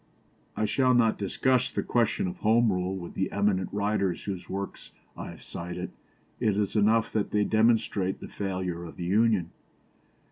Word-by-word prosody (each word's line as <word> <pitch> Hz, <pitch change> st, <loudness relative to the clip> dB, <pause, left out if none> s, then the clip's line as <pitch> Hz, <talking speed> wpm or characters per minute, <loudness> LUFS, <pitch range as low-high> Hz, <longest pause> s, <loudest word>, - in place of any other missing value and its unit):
" -, -, -34 dB
I 110 Hz, -, +1 dB
shall 130 Hz, +3 st, +3 dB
not 115 Hz, -2 st, +3 dB
discuss 125 Hz, +5 st, +1 dB
the -, -, -2 dB
question 120 Hz, -, +1 dB
of 185 Hz, 0 st, -5 dB
Home 115 Hz, -5 st, +3 dB
Rule 90 Hz, +1 st, -1 dB
with 85 Hz, -2 st, -7 dB
the 95 Hz, -, -1 dB
eminent 100 Hz, -3 st, +1 dB
writers 100 Hz, -3 st, 0 dB
whose 95 Hz, -3 st, -5 dB
works 100 Hz, +1 st, -6 dB, 0.2 s
I -, -, -6 dB
have -, -, -11 dB
cited. 90 Hz, +1 st, -6 dB, 0.5 s
It 105 Hz, -2 st, +1 dB
is 105 Hz, 0 st, 0 dB
enough 110 Hz, +2 st, +3 dB
that 105 Hz, -2 st, 0 dB
they 105 Hz, 0 st, +2 dB
demonstrate 110 Hz, -3 st, +2 dB
the -, -, -8 dB
failure 90 Hz, -3 st, -3 dB
of 85 Hz, -, -9 dB
the 85 Hz, -, -5 dB
Union. 100 Hz, -2 st, +2 dB
100 Hz, 175 wpm, -28 LUFS, 95-115 Hz, 0.5 s, shall